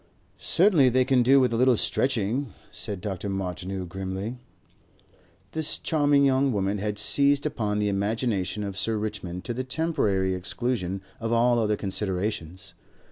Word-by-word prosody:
"Certainly 170 -8 +4
they 130 +1 +2
can 130 -2 +3
do 135 +3 +5
with 125 -2 +2
a - - 0
little 125 -1 +4
stretching," 125 0 0 0.2
said 100 -3 -4
Dr. 100 0 -4
Martineau 95 0 -4
grimly. 95 +6 -5 1.1
This 160 -1 +1
charming 145 -3 +2
young 135 0 +2
woman 100 -1 -1
had 105 0 -3
seized 140 +7 +3
upon 110 -9 -1
the 105 0 0
imagination 100 -1 -1
of 100 -1 -5
Sir 110 +3 -1
Richmond 90 -4 -5
to 120 - -3
the 130 +2 -3
temporary 125 - 0
exclusion 95 +1 -2 0.2
of 115 0 -3
all 120 +1 +3
other 105 -2 +1
considerations. 95 -2 -3
105 Hz, 145 wpm, -26 LUFS, 95-130 Hz, 1.1 s, do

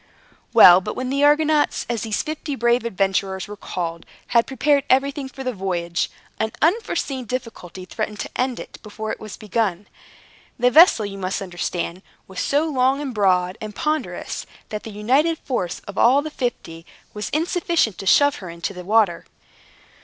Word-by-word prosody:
Well! 180 +1 +9
But 210 - -5
when 255 0 -3
the 280 +1 +1
Argonauts, 300 0 +3
as 235 -3 -2
these 215 -1 -1
fifty 310 -2 -4
brave 240 0 +2
adventurers 195 -2 -1
were 210 - -8
called, 170 -4 -5 0.3
had 235 -1 +3
prepared 280 +2 +2
everything 275 +1 +1
for 265 0 -8
the 255 -1 -2
voyage, 175 -3 -2 0.3
an 220 0 -1
unforeseen 305 - 0
difficulty 215 -7 -6
threatened 210 +1 -4
to - - -5
end 255 -1 -1
it - - -10
before 215 0 -6
it - - -5
was 215 -2 -9
begun. 210 -3 -2 0.7
The 250 0 +3
vessel, 310 - +7
you 195 -1 -7
must 185 0 -2
understand, 175 -1 -4 0.3
was 190 -1 -8
so 290 +3 +1
long, 265 -2 +2
and 280 -3 -4
broad, 185 -3 +1
and 215 -1 -7
ponderous, 305 0 -3 0.2
that 210 -1 -4
the - - -9
united 265 +11 +1
force 190 - -3
of 200 - -7
all 265 +5 +5
the 310 - -6
fifty 195 - -4 0.3
was 210 0 -4
insufficient 330 - 0
to 195 - -6
shove 285 +10 +5
her 185 - -8
into 170 +3 -5
the 180 -1 -8
water. 205 -3 +2
225 Hz, 170 wpm, -22 LUFS, 190-275 Hz, 0.7 s, Well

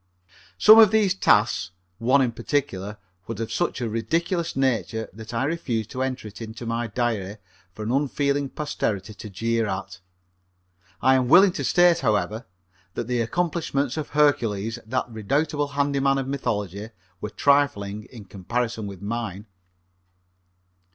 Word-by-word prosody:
Some 215 +1 +9
of 220 -2 +9
these 210 -3 +3
tasks, 105 - +2 0.3
one 130 +4 +4
in 125 - 0
particular 115 -5 -2 0.3
was 115 - -5
of 115 - -3
such - - -1
a 120 - -1
ridiculous 165 - -1
nature 115 -5 0
that 110 +1 -10
I 115 +2 -1
refuse 135 -7 -1
to 130 - -5
enter 130 -3 -3
it 105 +2 -11
into 115 +1 -7
my 115 +1 -2
diary 110 -3 -2 0.4
for 110 - -6
an 110 - -2
unfeeling 140 0 0
posterity 110 -10 -3
to 105 +1 -9
jeer 115 +3 -1
at. 95 -1 -5 1.0
I 130 - +6
am 130 -1 +2
willing 185 +8 +7
to 185 - -4
state, 175 -1 +4
however, 110 -1 0 0.5
that 120 - -2
the 120 0 0
accomplishments 145 -1 -1
of 155 -2 -4
Hercules, 115 -7 +1
that 130 +2 -1
redoubtable 145 +7 -1
handy 140 0 0
man 135 0 +2
of 135 -1 -2
mythology, 105 -6 -3 0.3
were 105 - -3
trifling 105 -4 +1
in 115 -5 -12
comparison 110 +3 -3
with 100 -1 -9
mine. 105 -2 -4
120 Hz, 150 wpm, -24 LUFS, 105-140 Hz, 1.0 s, Some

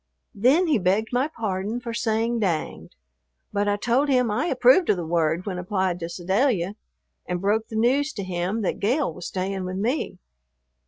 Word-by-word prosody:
Then 260 - +3
he 300 -8 +2
begged 195 +4 +1
my 255 +4 +2
pardon 215 -4 -3
for 235 -1 -6
saying 230 0 0
"danged," 175 -7 -2 0.6
but 205 0 0
I 205 - +2
told 245 +7 +1
him 250 -4 +3
I 260 +11 0
approved 260 +5 +4
of 195 - +4
the 175 - -3
word 165 +1 0
when 185 -3 -3
applied 185 -1 -1
to 165 -1 -5
Sedalia, 190 +2 0 0.5
and 180 0 -2
broke 210 +4 0
the 220 - -8
news 265 +6 +2
to 200 - -5
him 185 +4 -2
that - - -1
Gale 245 - +1
was 175 +1 -7
staying 190 0 -3
with 185 +1 -4
me. 230 0 -1
210 Hz, 180 wpm, -24 LUFS, 185-245 Hz, 0.6 s, approved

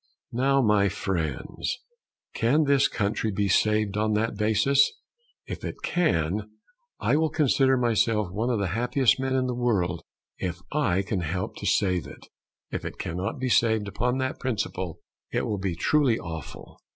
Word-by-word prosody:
Now, 135 +2 +2
my 105 -2 +4
friends, 85 -8 -3 0.6
can 140 +7 +3
this 140 -1 +4
country 105 +1 -1
be 100 +1 0
saved 105 +1 +2
on 110 0 +1
that 110 +1 0
basis? 110 +7 +3 0.5
If - - -7
it - - -4
can, 100 - 0 0.5
I - - +2
will 160 0 +2
consider 135 -3 +3
myself 115 -4 +1
one 110 +6 -1
of 120 - +1
the 100 -3 -1
happiest 125 +1 +2
men 130 0 0
in 130 -1 +2
the 125 - -1
world 100 -9 0 0.4
if 90 -1 -3
I 100 -11 +1
can 100 0 -2
help 90 +2 -3
to - - -4
save 90 -7 +1
it. - - -12 0.5
If - - -3
it - - -6
cannot 90 - -3
be 130 0 -2
saved 110 -3 +3
upon 120 +6 -1
that 130 0 -2
principle, 95 -8 -3 0.3
it - - 0
will 105 - -2
be 95 -3 -2
truly 130 - +2
awful. 80 - -8
110 Hz, 165 wpm, -26 LUFS, 95-130 Hz, 0.6 s, my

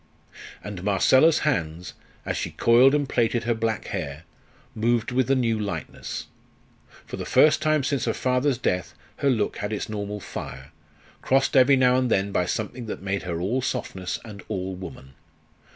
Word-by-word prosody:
And 105 -3 -6
Marcella's 130 - +4
hands, 85 - -1 0.3
as - - -2
she - - -2
coiled 125 +4 +5
and 145 -2 0
plaited 120 -2 +1
her 120 +1 +1
black 110 -1 -2
hair, 80 -5 -5 0.5
moved 115 +1 0
with 130 +1 +1
a 135 - +4
new 115 -4 +1
lightness; 95 -7 -5 0.8
for - - -7
the - - -4
first 155 0 +4
time 155 -2 +2
since 135 -2 -1
her - - 0
father's 130 +1 +1
death 90 -6 -2 0.2
her 140 - +1
look 110 -5 0
had 105 +1 -4
its 105 - -3
normal 105 -1 -4
fire, 65 -6 -8 0.5
crossed 135 +2 +2
every 135 +1 +6
now 125 -1 +4
and 130 -1 +1
then 100 -2 +1
by 90 -2 0
something 115 +4 -4
that 100 - -6
made 100 0 -1
her 85 -3 -4
all 110 +9 0
softness 95 -7 -3
and 105 -3 -9
all 95 0 -3
woman. 85 -7 -10
110 Hz, 170 wpm, -25 LUFS, 95-130 Hz, 0.8 s, every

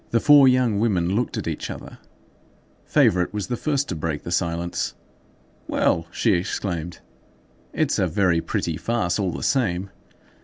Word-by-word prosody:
The 115 - +2
four 145 +1 +7
young 125 -5 +3
women 95 -5 +1
looked 120 +3 -1
at - - -4
each - - -4
other. - - -9 0.9
Favourite 90 -1 +3
was 105 -2 -2
the 120 - -3
first 145 +2 -1
to 90 - -2
break 80 -2 -3
the 85 - -6
silence. 85 -1 -2 0.7
"Well!" 85 0 +1
she 110 - +1
exclaimed, 85 -2 -3 0.7
"it's - - 0
a - - +2
very 90 -5 +2
pretty 80 -1 -2
farce, 110 -6 -1
all 95 -2 0
the - - -6
same." 100 -8 0
95 Hz, 155 wpm, -23 LUFS, 85-115 Hz, 0.9 s, four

